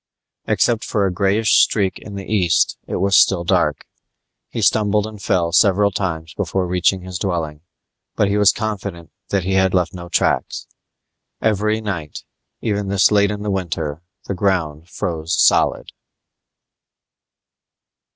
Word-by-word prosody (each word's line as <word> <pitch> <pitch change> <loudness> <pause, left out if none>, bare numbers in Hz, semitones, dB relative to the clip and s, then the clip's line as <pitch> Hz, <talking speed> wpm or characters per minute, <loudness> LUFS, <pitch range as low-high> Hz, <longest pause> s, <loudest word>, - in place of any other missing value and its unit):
Except 115 -2 +1
for 105 -2 0
a 95 - -1
greyish 100 +3 +3
streak 95 -4 +1
in 100 - -10
the 100 -1 -6
east, 90 -7 +1
it - - -4
was 100 +1 +1
still 90 -2 +4
dark. - - 0 0.6
He - - -5
stumbled 105 -1 +2
and 110 -2 -9
fell 90 -3 0
several 100 +3 +4
times 80 -4 -4
before 95 -1 -2
reaching 90 +1 +1
his 90 -1 -6
dwelling, 80 -6 -3 0.5
but 105 - +2
he 100 - 0
was 105 -1 +5
confident 100 -6 -5 0.2
that 100 -2 0
he 95 +2 -1
had 95 -1 +2
left 90 -2 0
no 85 -1 -9
tracks. - - 0 0.7
Every 110 0 0
night, 85 -8 -5 0.4
even 105 -2 -2
this 100 +1 +3
late 100 -1 +3
in 105 0 -4
the 105 - -2
winter, 85 -5 -3 0.2
the - - -3
ground 90 -5 -1
froze 80 -1 -3
solid. - - +3
95 Hz, 145 wpm, -19 LUFS, 85-105 Hz, 0.7 s, was